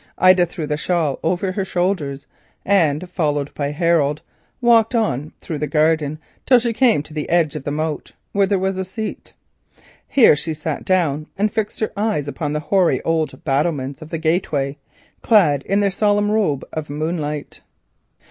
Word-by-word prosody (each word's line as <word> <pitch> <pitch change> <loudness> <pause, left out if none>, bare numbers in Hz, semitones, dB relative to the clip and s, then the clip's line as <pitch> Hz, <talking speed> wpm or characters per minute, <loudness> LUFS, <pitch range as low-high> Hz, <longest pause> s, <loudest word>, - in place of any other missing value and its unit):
Ida 185 -1 +5
threw 165 -2 -5
the 150 0 -2
shawl 160 -3 0
over 180 +3 0
her 195 +1 -2
shoulders 175 -7 -2 0.4
and 175 -4 +2
followed 150 -5 -1
by 145 -1 -2
Harold 150 -2 +1 0.4
walked 235 -1 +4
on 155 - 0
through 155 -3 -5
the 150 - -1
garden 155 0 +1 0.3
till 255 - +7
she 235 -1 0
came 225 - +3
to 155 - -13
the 150 -1 -4
edge 165 -4 +2
of 150 - -6
the 145 - -2
moat, 155 +1 -3 0.2
where 200 -1 +2
there 200 0 +1
was 190 0 -1
a 190 - -1
seat. 215 +4 -6 0.7
Here 245 - +6
she 160 +2 -4
sat 155 0 -4
down 155 -5 +1
and 210 +1 0
fixed 220 -1 -3
her 220 - 0
eyes 205 -8 -1
upon 145 +1 -3
the 150 - -2
hoary 185 +2 +2 0.5
battlements 140 -1 -1
of 155 - -9
the 165 - -3
gateway, 155 -4 0
now 140 0 -22 0.2
clad 165 - +4
in 200 +1 +2
a 200 - +2
solemn 205 +1 +1
robe 195 -11 0
of 155 -2 -4
moonlight. 150 0 -4
165 Hz, 175 wpm, -20 LUFS, 150-195 Hz, 0.7 s, till